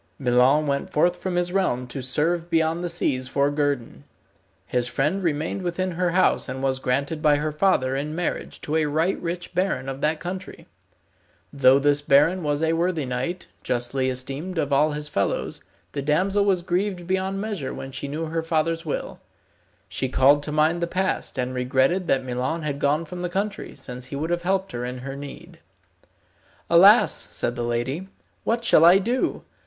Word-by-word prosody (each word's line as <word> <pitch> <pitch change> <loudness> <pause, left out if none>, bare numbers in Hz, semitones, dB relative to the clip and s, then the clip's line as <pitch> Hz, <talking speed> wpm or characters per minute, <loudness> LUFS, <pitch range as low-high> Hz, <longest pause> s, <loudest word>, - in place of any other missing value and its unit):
Milon 130 +3 +3
went 140 -1 -2
forth 175 +4 +2
from 180 0 -3
his 175 0 0
realm 155 -11 0
to 130 +2 -6
serve 165 +6 -1
beyond 165 +1 +1
the 175 - -2
seas 130 -6 0
for 140 +2 +1
guerdon. 145 -4 -2 0.6
His 125 -1 0
friend 150 +10 0
remained 160 +2 -1
within 185 +1 -2
her 180 +1 0
house 180 -5 +2
and 130 +1 -5
was 130 -1 +1
granted 140 +5 -1
by 150 -1 +4
her 150 +1 -1
father 150 -6 +1
in 150 +3 -3
marriage 175 0 -3
to 155 +2 -1
a 155 -1 +1
right 160 +6 0
rich 175 +1 -4
baron 180 -8 -1
of 135 +1 -5
that 155 +1 +1
country. 185 +1 -7 0.9
Though 135 -1 +5
this 145 +1 +2
baron 145 +6 +4
was 150 0 -1
a 160 0 +2
worthy 165 -2 0
knight, 130 +9 -3 0.2
justly 125 +2 -1
esteemed 135 +8 -4
of 145 -3 0
all 150 +2 +3
his 150 0 -4
fellows, 100 -9 -2 0.3
the 140 - -3
damsel 185 +8 +1
was 185 -3 +2
grieved 180 0 -1
beyond 190 +2 -1
measure 200 -10 -3
when 135 - -7
she 140 +2 -5
knew 155 +3 -3
her 165 +1 -2
father's 165 0 0
will. 155 - -4 0.7
She 130 - -2
called 140 +3 +4
to 150 - -5
mind 155 +3 +2
the 170 - 0
past, 185 -3 -2
and 130 0 -2
regretted 130 +8 +1
that 130 -1 +1
Milon 130 +6 -2
had 145 -2 -3
gone 145 +3 +1
from 175 +3 -7
the 180 - -2
country, 200 +3 -3
since 125 0 -8
he 135 - -7
would 155 +4 -3
have 175 0 0
helped 190 +2 -1
her 120 0 -4
in 125 +1 -4
her 135 +2 -6
need. 160 +5 -10 1.1
"Alas!" - - +6
said 120 - -2
the 120 - -4
lady, 120 +9 -2 0.4
"what 235 +1 0
shall 165 - +5
I 175 +3 +8
do? 235 +6 -1
150 Hz, 185 wpm, -24 LUFS, 135-175 Hz, 1.1 s, I